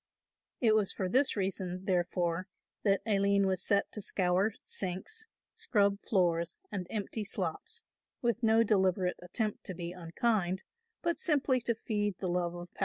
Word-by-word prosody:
It 225 Hz, -3 st, +4 dB
was 215 Hz, -3 st, +3 dB
for 190 Hz, -, -2 dB
this 260 Hz, +9 st, +3 dB
reason 190 Hz, -2 st, -2 dB
therefore 175 Hz, -1 st, 0 dB, 0.4 s
that 200 Hz, -2 st, +3 dB
Aline 200 Hz, -2 st, +3 dB
was 190 Hz, -1 st, +1 dB
set 200 Hz, +1 st, +2 dB
to 210 Hz, -, -5 dB
scour 190 Hz, +2 st, +1 dB
sinks, 200 Hz, -, -2 dB, 0.3 s
scrub 200 Hz, -3 st, +2 dB
floors 170 Hz, -4 st, +1 dB
and 185 Hz, -3 st, -3 dB
empty 215 Hz, 0 st, -3 dB
slops, 205 Hz, -, -2 dB, 0.4 s
with 235 Hz, -1 st, 0 dB
no 225 Hz, 0 st, +5 dB
deliberate 190 Hz, -3 st, +2 dB
attempt 210 Hz, +4 st, -2 dB
to 185 Hz, -, -4 dB
be 170 Hz, 0 st, -4 dB
unkind, 185 Hz, +2 st, 0 dB, 0.4 s
but 340 Hz, -3 st, 0 dB
simply 280 Hz, -6 st, +3 dB
to 235 Hz, 0 st, 0 dB
feed 205 Hz, -3 st, -1 dB
the 190 Hz, -, -3 dB
love 175 Hz, -1 st, 0 dB
of 175 Hz, 0 st, -9 dB
power. -, -, -19 dB
195 Hz, 155 wpm, -32 LUFS, 180-220 Hz, 0.4 s, no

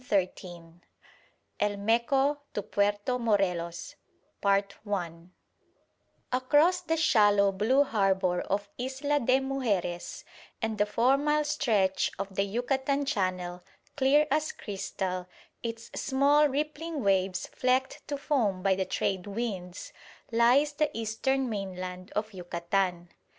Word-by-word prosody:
CHAPTER 205 Hz, -5 st, +3 dB
IX 185 Hz, +1 st, -10 dB, 1.1 s
EL 205 Hz, 0 st, 0 dB
MECO 240 Hz, +7 st, +2 dB, 0.2 s
TO 205 Hz, -, -2 dB
PUERTO 205 Hz, +6 st, 0 dB
MORELOS 180 Hz, -6 st, -1 dB, 2.4 s
Across 310 Hz, +7 st, +4 dB
the 325 Hz, -, +1 dB
shallow 205 Hz, -9 st, +4 dB
blue 225 Hz, +9 st, +3 dB
harbour 190 Hz, -7 st, +1 dB
of 200 Hz, +1 st, -2 dB
Isla 270 Hz, +3 st, -1 dB
de 255 Hz, +1 st, +3 dB
Mujeres 225 Hz, -11 st, -2 dB, 0.4 s
and 220 Hz, -2 st, -2 dB
a 205 Hz, -, +3 dB
four 250 Hz, +6 st, +3 dB
mile 300 Hz, +1 st, +1 dB
stretch 230 Hz, -11 st, +1 dB
of 195 Hz, 0 st, -5 dB
the 195 Hz, -, 0 dB
Yucatan 265 Hz, +7 st, 0 dB
Channel, 185 Hz, -6 st, -2 dB, 0.3 s
clear 290 Hz, +2 st, +4 dB
as 305 Hz, +2 st, +1 dB
crystal, 190 Hz, -2 st, -4 dB, 0.3 s
its 230 Hz, -1 st, -6 dB
small 285 Hz, +2 st, +3 dB
rippling 300 Hz, +1 st, -3 dB
waves 190 Hz, -1 st, +1 dB
flecked 255 Hz, +1 st, -1 dB
to 285 Hz, -, -3 dB
foam 225 Hz, -11 st, 0 dB
by 195 Hz, -1 st, +4 dB
the 190 Hz, 0 st, -1 dB
trade 190 Hz, 0 st, -2 dB
winds, 195 Hz, -4 st, -5 dB, 0.4 s
lies 245 Hz, +6 st, +4 dB
the 300 Hz, 0 st, +1 dB
eastern 255 Hz, +5 st, 0 dB
mainland 185 Hz, -3 st, -5 dB
of 215 Hz, 0 st, -2 dB
Yucatan. 175 Hz, 0 st, -2 dB
220 Hz, 115 wpm, -29 LUFS, 190-270 Hz, 2.4 s, Across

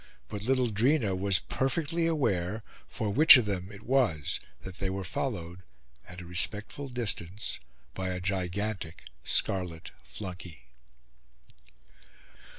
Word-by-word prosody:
But 105 Hz, -, -5 dB
little 125 Hz, +1 st, +1 dB
Drina 115 Hz, -1 st, +2 dB
was 95 Hz, 0 st, +3 dB
perfectly 165 Hz, -, -1 dB
aware 110 Hz, -, 0 dB, 0.2 s
for 105 Hz, -2 st, -3 dB
which 155 Hz, +6 st, +10 dB
of 125 Hz, -, +1 dB
them 95 Hz, -1 st, -3 dB
it 100 Hz, +1 st, -12 dB
was 120 Hz, -, +1 dB, 0.2 s
that 95 Hz, 0 st, -9 dB
they 95 Hz, -, -1 dB
were 95 Hz, 0 st, -3 dB
followed, 90 Hz, -5 st, -4 dB, 0.5 s
at 90 Hz, +1 st, -9 dB
a -, -, -10 dB
respectful 105 Hz, +10 st, +1 dB
distance, 105 Hz, -5 st, -2 dB, 0.3 s
by 95 Hz, +5 st, -3 dB
a 90 Hz, -1 st, -3 dB
gigantic 95 Hz, -1 st, -3 dB, 0.2 s
scarlet 90 Hz, +2 st, -1 dB
flunkey. 85 Hz, -, -9 dB
100 Hz, 120 wpm, -29 LUFS, 90-120 Hz, 0.5 s, which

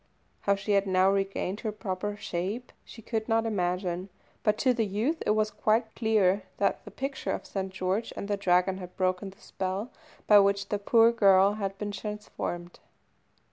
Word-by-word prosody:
How 200 Hz, -, +2 dB
she 200 Hz, +1 st, -4 dB
had 200 Hz, -1 st, +3 dB
now 185 Hz, +1 st, +4 dB
regained 195 Hz, 0 st, -1 dB
her 220 Hz, -, -3 dB
proper 205 Hz, -1 st, -4 dB
shape 200 Hz, +7 st, -4 dB
she 225 Hz, -, -13 dB
could 220 Hz, +1 st, -3 dB
not 225 Hz, 0 st, +2 dB
imagine, 180 Hz, -2 st, -1 dB, 0.3 s
but 210 Hz, 0 st, +2 dB
to 255 Hz, +1 st, +3 dB
the 225 Hz, -3 st, 0 dB
youth 230 Hz, -, -1 dB
it 210 Hz, -, +3 dB
was 215 Hz, 0 st, +1 dB
quite 220 Hz, +1 st, +1 dB
clear 210 Hz, -4 st, +2 dB, 0.2 s
that 200 Hz, -, 0 dB
the -, -, -8 dB
picture 270 Hz, +7 st, -3 dB
of -, -, -5 dB
St. 190 Hz, -1 st, -4 dB
George 190 Hz, +4 st, -2 dB
and 200 Hz, -, -4 dB
the 205 Hz, -, 0 dB
Dragon 185 Hz, -1 st, +2 dB
had 180 Hz, -1 st, -10 dB
broken 185 Hz, +1 st, 0 dB
the 190 Hz, -, -17 dB
spell 195 Hz, +6 st, -4 dB, 0.3 s
by 210 Hz, -1 st, +8 dB
which 200 Hz, 0 st, +2 dB
the 205 Hz, -, -1 dB
poor 230 Hz, +3 st, +5 dB
girl 200 Hz, -3 st, +5 dB
had 195 Hz, -2 st, -4 dB
been 205 Hz, 0 st, -4 dB
transformed. 200 Hz, -4 st, -5 dB
200 Hz, 180 wpm, -28 LUFS, 190-215 Hz, 0.3 s, by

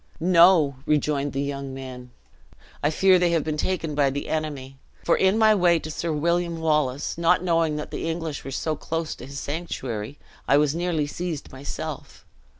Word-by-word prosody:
"No," 170 Hz, -4 st, +5 dB
rejoined 145 Hz, -1 st, +1 dB
the 135 Hz, +1 st, -2 dB
young 140 Hz, -1 st, -5 dB
man; 130 Hz, -2 st, -8 dB, 0.7 s
"I 145 Hz, -, +2 dB
fear 185 Hz, +3 st, +4 dB
they 175 Hz, -1 st, +3 dB
have 165 Hz, -3 st, +2 dB
been 155 Hz, -1 st, -2 dB
taken 165 Hz, -1 st, -2 dB
by 145 Hz, -1 st, +3 dB
the 140 Hz, +2 st, -4 dB
enemy; 140 Hz, -4 st, -4 dB, 0.2 s
for 170 Hz, -, +3 dB
in 190 Hz, +3 st, +3 dB
my 220 Hz, -1 st, +6 dB
way 175 Hz, -4 st, +4 dB
to 155 Hz, -1 st, -6 dB
Sir 165 Hz, +2 st, -3 dB
William 170 Hz, +2 st, 0 dB
Wallace, 150 Hz, -2 st, 0 dB
not 170 Hz, +1 st, +3 dB
knowing 165 Hz, -3 st, +1 dB
the 150 Hz, +2 st, -4 dB
English 160 Hz, -3 st, -4 dB
were -, -, -6 dB
so 155 Hz, +3 st, -2 dB
close 165 Hz, +1 st, -3 dB
to 125 Hz, -, -10 dB
his 140 Hz, 0 st, -6 dB
sanctuary, 135 Hz, -6 st, -5 dB, 0.3 s
I 140 Hz, -, +5 dB
was 150 Hz, -1 st, +2 dB
nearly 170 Hz, -3 st, -1 dB
seized 165 Hz, 0 st, -5 dB
myself. 135 Hz, +2 st, -7 dB
155 Hz, 175 wpm, -24 LUFS, 140-170 Hz, 0.7 s, my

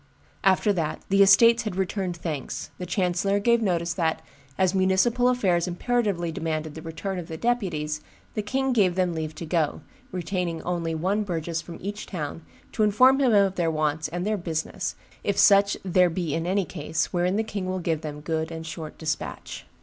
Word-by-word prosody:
"After 195 Hz, +2 st, +4 dB
that 160 Hz, -4 st, -2 dB
the 195 Hz, 0 st, +4 dB
estates 230 Hz, +4 st, +7 dB
had 215 Hz, -5 st, -4 dB
returned 190 Hz, -1 st, -2 dB
thanks, 155 Hz, -5 st, -5 dB
the 180 Hz, -, -5 dB
chancellor 185 Hz, +2 st, +1 dB
gave 235 Hz, +3 st, +3 dB
notice 175 Hz, -4 st, 0 dB
that, 160 Hz, -3 st, -1 dB, 0.3 s
as 185 Hz, -1 st, +2 dB
municipal 195 Hz, +6 st, +3 dB
affairs 185 Hz, -9 st, +2 dB
imperatively 185 Hz, -2 st, 0 dB
demanded 155 Hz, -1 st, -3 dB
the 160 Hz, -, -8 dB
return 165 Hz, +4 st, -4 dB
of 170 Hz, -, -7 dB
the 160 Hz, -, -6 dB
deputies, 160 Hz, -10 st, -1 dB, 0.3 s
the 215 Hz, -, -1 dB
king 265 Hz, +5 st, 0 dB
gave 190 Hz, -6 st, +3 dB
them 180 Hz, -2 st, +1 dB
leave 160 Hz, -1 st, -4 dB
to 165 Hz, -, -6 dB
go, 160 Hz, -2 st, 0 dB, 0.3 s
retaining 180 Hz, -2 st, -2 dB
only 170 Hz, -2 st, -2 dB
one 190 Hz, +6 st, 0 dB
burgess 170 Hz, -4 st, -2 dB
from 170 Hz, 0 st, -9 dB
each 205 Hz, +2 st, -5 dB
town, 160 Hz, -3 st, -5 dB, 0.3 s
to -, -, -2 dB
inform 255 Hz, +6 st, +5 dB
him 260 Hz, -3 st, +4 dB
of 200 Hz, -2 st, +4 dB
their 175 Hz, -3 st, 0 dB
wants 155 Hz, 0 st, 0 dB
and 175 Hz, +4 st, -4 dB
'their 215 Hz, 0 st, 0 dB
business, 175 Hz, +2 st, -3 dB, 0.3 s
if 200 Hz, -, 0 dB
such 200 Hz, 0 st, +5 dB
there 180 Hz, -1 st, +4 dB
be 165 Hz, -3 st, -2 dB
in 165 Hz, +1 st, -1 dB
any 190 Hz, +1 st, +1 dB
case, 160 Hz, -1 st, -3 dB
wherein 180 Hz, +1 st, +1 dB
the 220 Hz, -, +1 dB
king 200 Hz, -4 st, -4 dB
will 185 Hz, 0 st, -1 dB
give 165 Hz, -3 st, -1 dB
them 150 Hz, -1 st, -6 dB
good 160 Hz, +1 st, -2 dB
and 160 Hz, -1 st, -6 dB
short 160 Hz, -1 st, -7 dB
despatch. 160 Hz, -, -5 dB
180 Hz, 190 wpm, -25 LUFS, 160-200 Hz, 0.3 s, estates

